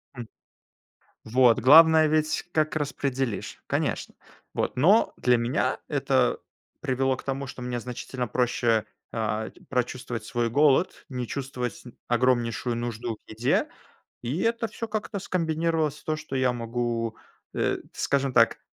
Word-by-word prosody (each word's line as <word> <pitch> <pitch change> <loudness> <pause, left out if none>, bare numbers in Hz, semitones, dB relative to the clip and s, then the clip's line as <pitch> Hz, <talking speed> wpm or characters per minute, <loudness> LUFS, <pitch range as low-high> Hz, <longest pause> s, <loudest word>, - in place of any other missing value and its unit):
М. 120 -2 -7 1.0
Вот. 120 0 +4
Главное 160 +4 +8
ведь, 155 0 +1
как 155 0 +1
распределишь, 135 -7 -2
конечно. - - -2 0.4
Вот. - - -1
Но 190 - +4
для 125 -1 +3
меня 120 +1 0
это - - +1 0.4
привело 130 0 0
к - - -10
тому, 135 0 -3
что 130 -2 -8
мне 125 -1 -3
значительно 125 +1 -5
проще, 115 -1 +1 0.3
а, 110 -1 -2 0.2
прочувствовать 125 -2 -2
свой 120 -1 -1
голод, 145 +6 +4 0.2
м, 130 - -7
не 125 - -2
чувствовать 130 -3 -4 0.3
огромнейшую 120 -1 +1
нужду 120 -1 -3
к - - -36
еде. 115 +4 +1 0.5
И 130 +9 -2
это 230 0 +1
всё 225 +2 -6
как-то 215 -1 -3
скомбинировалось 160 -4 0
в - - -25
то, 155 0 -1
что 150 -3 -5
я 130 -1 +2
могу, 115 -1 -2 0.4
э, - - 0 0.2
скажем 140 -1 0
так, 115 -2 +4
130 Hz, 140 wpm, -26 LUFS, 120-150 Hz, 1.0 s, Главное